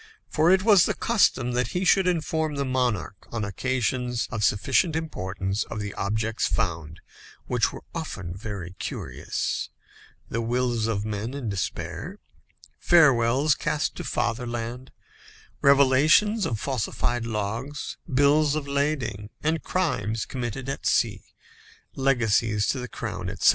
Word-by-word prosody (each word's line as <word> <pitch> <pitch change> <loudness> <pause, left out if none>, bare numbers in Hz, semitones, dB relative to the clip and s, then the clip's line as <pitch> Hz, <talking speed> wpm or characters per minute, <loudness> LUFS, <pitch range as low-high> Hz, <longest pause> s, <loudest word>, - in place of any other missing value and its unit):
For 160 +2 +2
it 190 +1 +5
was 205 -5 +6
the - - -1
custom 160 - +2
that 120 -1 -1
he 185 - 0
should 190 +1 +4
inform 160 -3 0
the 140 0 -1
monarch, 125 -7 -1
on 110 -2 -2
occasions 125 +2 -1
of 110 -2 -2
sufficient 120 - +2
importance, 100 - -2
of 110 - -6
the 100 -1 -4
objects 110 +3 -1
found, 85 -2 -2 0.4
which 120 -2 +1
were - - -10
often 100 - -5
very 100 -3 -6
curious: - - -3 0.6
the 115 - -2
wills 120 -1 0
of 105 -2 -1
men 110 +4 -3
in 130 -6 -3
despair, 100 -2 -4 0.6
farewells 140 - +5
cast 150 +1 -1
to - - -4
fatherland, 120 +1 -3 0.7
revelations 140 +10 +5
of 110 - -2
falsified 120 -2 -1
logs, 115 +7 -4
bills 145 +2 +4
of 150 -2 -3
lading, 140 -7 -1
and 160 +1 +1
crimes 115 - -1
committed 125 0 -4
at 135 - -3
sea, - - +1 0.7
legacies 115 -5 +2
to 135 - 0
the 125 - -5
crown, 90 -7 -5
etc. 95 - +3
125 Hz, 135 wpm, -26 LUFS, 105-145 Hz, 0.7 s, was